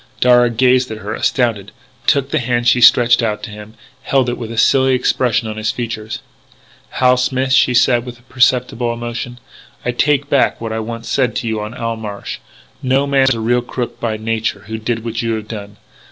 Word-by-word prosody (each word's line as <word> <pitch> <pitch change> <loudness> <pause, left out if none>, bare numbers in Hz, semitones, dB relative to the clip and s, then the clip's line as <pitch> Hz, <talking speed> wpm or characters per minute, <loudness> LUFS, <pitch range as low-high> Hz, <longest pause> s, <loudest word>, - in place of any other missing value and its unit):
Darragh 120 -2 +4
gazed 130 0 +3
at 110 - -5
her, 105 0 -5
astounded; 110 -6 0 0.4
took 140 0 +2
the - - +1
hand 120 -1 -1
she 125 +1 +4
stretched 120 +1 +6
out 105 -2 -2
to 105 - -6
him; 105 +1 -11 0.3
held 135 -2 +1
it - - -1
with 115 -2 -6
a 115 - -7
silly 130 +3 +4
expression 125 -2 +1
on 110 0 -5
his 110 0 -1
features. 110 -2 -4 0.8
"Hal 125 0 +4
Smith," 130 +1 0
she 125 -1 +4
said 120 0 +3
with 120 0 -11
perceptible 125 -2 +1
emotion, 120 +1 -5 0.5
"I 120 - +1
take 145 +3 +1
back 140 -2 +2
what 115 -1 -4
I 110 - -2
once 115 +1 -6
said 125 -1 0
to 115 - -2
you 110 -1 -2
on 105 +3 -6
Owl 115 -2 -3
Marsh. 105 -2 -6 0.4
No 135 +2 +1
man 135 -1 +3
is 135 - +1
a - - -5
real 120 +2 +1
crook 120 0 -5
by 110 -2 -2
nature 110 -2 -2
who 110 +1 -5
did 115 0 -3
what 115 -1 -3
you 115 -1 -1
have 110 -1 -6
done. 105 -2 -8
120 Hz, 205 wpm, -17 LUFS, 110-125 Hz, 0.8 s, stretched